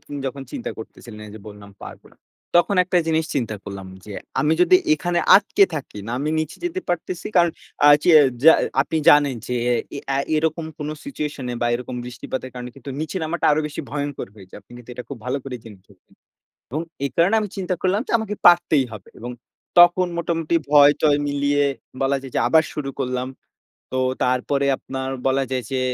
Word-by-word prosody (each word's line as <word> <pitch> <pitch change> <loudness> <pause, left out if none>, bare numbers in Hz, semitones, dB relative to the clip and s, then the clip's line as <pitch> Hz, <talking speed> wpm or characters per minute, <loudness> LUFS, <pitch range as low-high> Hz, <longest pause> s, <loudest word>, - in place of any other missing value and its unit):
আপনি - - -11
যখন 135 +1 -5
চিন্তা 265 -4 -4
করতেছিলেন, 110 0 -11
এইযে 105 +1 -11
বললাম 100 -1 -12
"পারবো - - -11
না," - - -23 0.4
তখন 180 +3 +3
একটা 180 0 +1
জিনিস 160 0 +1
চিন্তা 115 -6 -2
করলাম 100 -1 -7 0.2
যে, 105 - -9 0.3
আমি 155 +1 +2
যদি 180 +1 +6 0.2
এখানে 175 +3 -1 0.2
আটকে 200 0 +4
থাকি, 135 -8 -6
না 115 - -4
আমি 150 +2 -1
নিচে 155 0 -5
যেতে 350 +2 -2
পারতেছি; 175 +1 -3
কারণ 170 -1 +5 0.4
আ - - +9
চে 175 - +4 0.3
যা 160 - +10 0.3
আপনি 160 - -4
জানেন 145 -3 +6
যে, 125 - -3 0.4
এ - - -4 0.2
আ 135 - +1 0.2
এরকম 160 +1 -1
কোনো 150 +1 -4
সিচুয়েশন 150 - -5
এ - - -4
বা - - +2
এরকম 125 +1 -5
বৃষ্টিপাতের 125 +1 -6
কারণে 125 0 -7
কিন্তু, 135 +1 -9
নিচে 160 +4 -4
নামাটা 170 +2 -3
আরো 150 - +2
বেশি 150 - -6
ভয়ংকর 145 -4 -4
হয়ে 95 -3 -14
যায়। - - -10
আপনি - - -20
কিন্তু 120 0 -12
এটা 125 - -7
খুব 140 -4 -7
ভালো 130 +3 -1
করে 130 -2 -5
জেনে 105 -4 -13
থাকবেন। 95 -3 -25 0.6
এবং 155 +4 -2 0.2
এই - - -1
কারণে 180 +6 +3
আমি 210 - -4
চিন্তা 185 -1 -2
করলাম 190 +3 +1
যে, - - -5
আমাকে 215 -2 -4
পারতেই 175 -6 +4
হবে। 105 -3 -10
এবং 120 +2 -6 0.5
তখন 175 +1 +6
মোটামুটি 165 -1 -1
ভয়-টয় 145 0 +5
মিলিয়ে 145 0 +1 0.4
বলা 135 +1 +2
যায় 135 -2 -10
যে, - - +2
আবার 160 -1 +5
শুরু 140 -2 -4
করলাম। 125 -1 -2 0.7
তো 130 - -1 0.3
তারপরে 130 +2 0
আপনার 130 0 -5 0.2
বলা 135 0 +2
যায় 130 -2 -2
যে, 130 - 0
145 Hz, 195 wpm, -22 LUFS, 125-165 Hz, 0.7 s, যা